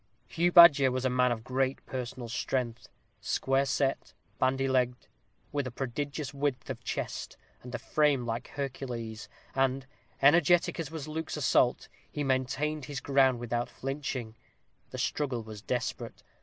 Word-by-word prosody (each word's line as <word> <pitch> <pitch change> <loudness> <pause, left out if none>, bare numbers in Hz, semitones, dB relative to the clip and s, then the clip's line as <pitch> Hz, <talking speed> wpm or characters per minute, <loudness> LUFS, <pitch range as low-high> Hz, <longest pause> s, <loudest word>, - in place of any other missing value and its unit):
Hugh 175 +2 +1
Badger 160 -6 +9
was 130 0 -2
a 130 - +2
man 125 0 +3
of 110 -2 -3
great 130 +1 -1
personal 125 -1 -5
strength 120 0 -2 0.3
square 135 +1 +1
set, 135 0 -1 0.2
bandy 135 +1 +2
legged, 125 -1 +1 0.5
with 145 -3 -1
a - - -3
prodigious 140 +3 -4
width 140 -2 -2
of 120 -2 -8
chest, - - -4 0.2
and 125 0 -7
a - - 0
frame 145 -5 +1
like 115 +2 -4
a - - -17
Hercules, 120 -5 -5 0.2
and, 135 0 +1 0.3
energetic 170 +5 +4
as 160 -4 -3
was 160 -2 -6
Luke's 160 +1 -4
assault, 130 -3 +2 0.2
he 150 - -2
maintained 135 +3 -1
his 145 -3 -5
ground 135 -3 +3
without 120 0 -2
flinching. 130 -4 -4 0.5
The - - -7
struggle 130 -6 -1
was 110 -2 -9
desperate. 120 +1 -4
130 Hz, 150 wpm, -30 LUFS, 125-145 Hz, 0.5 s, Badger